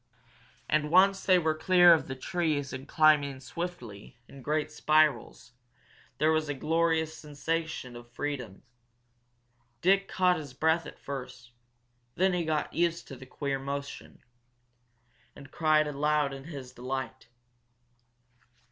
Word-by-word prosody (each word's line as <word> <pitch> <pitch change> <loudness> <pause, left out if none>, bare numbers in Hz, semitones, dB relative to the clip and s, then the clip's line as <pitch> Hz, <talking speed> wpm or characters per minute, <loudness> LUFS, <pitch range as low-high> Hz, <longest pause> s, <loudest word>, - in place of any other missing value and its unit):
And 150 0 +1
once 195 +3 +4
they 185 -1 +6
were 160 -3 +1
clear 175 +2 +6
of 160 - 0
the 130 - -5
trees 150 -1 -2
and 130 +1 -7
climbing 145 -3 +3
swiftly, 135 - -7
in 135 - -13
great 155 +3 -1
spirals, 155 -5 +1 0.7
there 155 +1 +3
was 155 -1 0
a 145 - -2
glorious 160 +1 0
sensation 150 -3 -4
of 120 0 -12
freedom. 125 -7 -5 1.2
Dick 195 +5 +3
caught 180 -1 +2
his 145 -5 -9
breath 160 +3 +1
at - - -11
first, 125 -3 -8 0.6
then 190 +1 +2
he 175 -2 -1
got 155 -1 -2
used 170 0 -1
to 135 - -8
the 130 +1 -13
queer 140 0 -3
motion, 140 +1 -7 1.1
and 140 -1 -13
cried 155 -1 +2
aloud 150 0 0
in 135 0 -9
his 135 -6 -9
delight. 130 -1 -5
150 Hz, 130 wpm, -29 LUFS, 135-165 Hz, 1.2 s, they